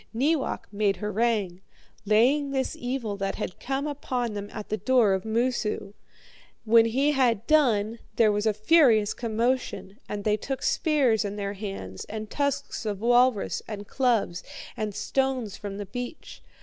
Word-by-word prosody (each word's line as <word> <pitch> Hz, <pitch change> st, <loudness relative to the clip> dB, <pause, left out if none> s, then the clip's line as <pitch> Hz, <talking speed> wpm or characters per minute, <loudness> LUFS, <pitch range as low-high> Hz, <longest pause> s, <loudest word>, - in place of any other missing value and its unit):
Neewak 285 Hz, +4 st, 0 dB
made 205 Hz, -1 st, +1 dB
harangue, 210 Hz, -3 st, -1 dB, 0.5 s
laying 260 Hz, +7 st, +3 dB
this 265 Hz, -1 st, -1 dB
evil 245 Hz, -4 st, -3 dB
that 195 Hz, 0 st, -2 dB
had 180 Hz, -, -5 dB
come 275 Hz, +2 st, -2 dB
upon 255 Hz, -5 st, -2 dB
them 205 Hz, 0 st, -5 dB
at 210 Hz, -2 st, -7 dB
the 215 Hz, -, -1 dB
door 220 Hz, -1 st, +3 dB
of 190 Hz, +1 st, -2 dB
Moosu. 220 Hz, -3 st, -1 dB, 0.7 s
When 230 Hz, +1 st, +6 dB
he 270 Hz, +6 st, +2 dB
had 240 Hz, -6 st, +2 dB
done, 230 Hz, -7 st, +2 dB, 0.2 s
there 220 Hz, -1 st, +4 dB
was 210 Hz, +1 st, 0 dB
a 215 Hz, -, +3 dB
furious 220 Hz, -3 st, +4 dB
commotion, 235 Hz, -2 st, -2 dB
and 205 Hz, -1 st, -4 dB
they 210 Hz, 0 st, +2 dB
took 270 Hz, +5 st, -4 dB
spears 275 Hz, -, +2 dB
in 205 Hz, 0 st, -4 dB
their 200 Hz, -1 st, -3 dB
hands, 195 Hz, -, -6 dB
and 215 Hz, 0 st, -7 dB
tusks 280 Hz, -2 st, -2 dB
of 210 Hz, -3 st, -3 dB
walrus, 245 Hz, -2 st, +3 dB
and 205 Hz, -2 st, -7 dB
clubs, 230 Hz, -9 st, 0 dB, 0.3 s
and 210 Hz, -2 st, -3 dB
stones 260 Hz, -7 st, -1 dB
from 200 Hz, -1 st, -6 dB
the 205 Hz, -, -5 dB
beach. 245 Hz, +7 st, -7 dB
225 Hz, 155 wpm, -26 LUFS, 205-260 Hz, 0.7 s, When